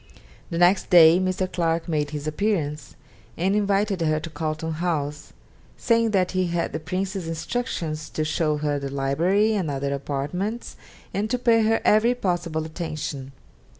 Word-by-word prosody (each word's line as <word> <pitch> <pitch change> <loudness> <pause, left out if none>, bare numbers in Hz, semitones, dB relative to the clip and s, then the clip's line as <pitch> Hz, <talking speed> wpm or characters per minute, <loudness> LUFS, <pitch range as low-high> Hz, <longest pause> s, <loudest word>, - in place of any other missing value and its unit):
The 165 - -3
next 175 +3 +3
day 170 -1 +8
Mr. 185 0 0
Clarke 165 -2 -1
made 150 -3 0
his 145 -1 -5
appearance, 155 -4 -2 0.4
and 190 +4 +1
invited 200 -2 +1
her 155 -1 +1
to 165 - -7
Carlton 155 +1 -3
House, 150 -4 -2 0.5
saying 230 -1 +2
that 190 -4 +1
he 185 -1 0
had 170 0 -2
the 155 - -2
Prince's 185 +2 -3
instructions 165 -3 -3
to 155 - -2
show 155 0 0
her 145 -1 -1
the 140 0 -4
library 165 +11 +1
and 190 -7 -1
other 140 0 -2
apartments, 150 - -3 0.4
and 205 +2 -1
to 250 - +1
pay 235 -2 +3
her 225 +1 +2
every 225 +4 +4
possible 175 -7 -2
attention. 155 -4 -5
170 Hz, 155 wpm, -24 LUFS, 155-195 Hz, 0.5 s, day